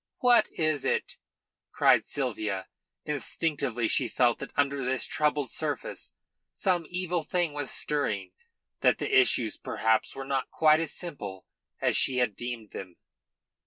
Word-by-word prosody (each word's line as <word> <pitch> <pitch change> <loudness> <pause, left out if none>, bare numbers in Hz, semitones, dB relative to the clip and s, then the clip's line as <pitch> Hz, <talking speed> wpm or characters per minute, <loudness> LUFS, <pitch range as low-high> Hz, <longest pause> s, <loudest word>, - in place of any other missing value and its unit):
"What 245 -1 +5
is 155 -3 +1
it?" - - -1 0.5
cried - - +4
Sylvia. 105 -8 -2 0.4
Instinctively 140 -5 -1
she 125 +3 +1
felt 120 +1 +2
that 135 - -6
under 140 -1 +1
this 130 +1 +1
troubled 150 -3 0
surface - - -3 0.4
some 175 -4 0
evil 180 -1 -1
thing 170 0 -1
was 145 -2 -3
stirring, 105 -11 -1 0.5
that - - +4
the - - -1
issues 125 -4 +3
perhaps 110 0 0
were 135 0 -6
not 135 -1 -1
quite 155 0 +4
as 165 - -1
simple 100 - -5 0.3
as - - +1
she 130 - +2
had 125 -5 +1
deemed 120 -3 -5
them. 90 -2 -8
135 Hz, 140 wpm, -28 LUFS, 115-155 Hz, 0.5 s, What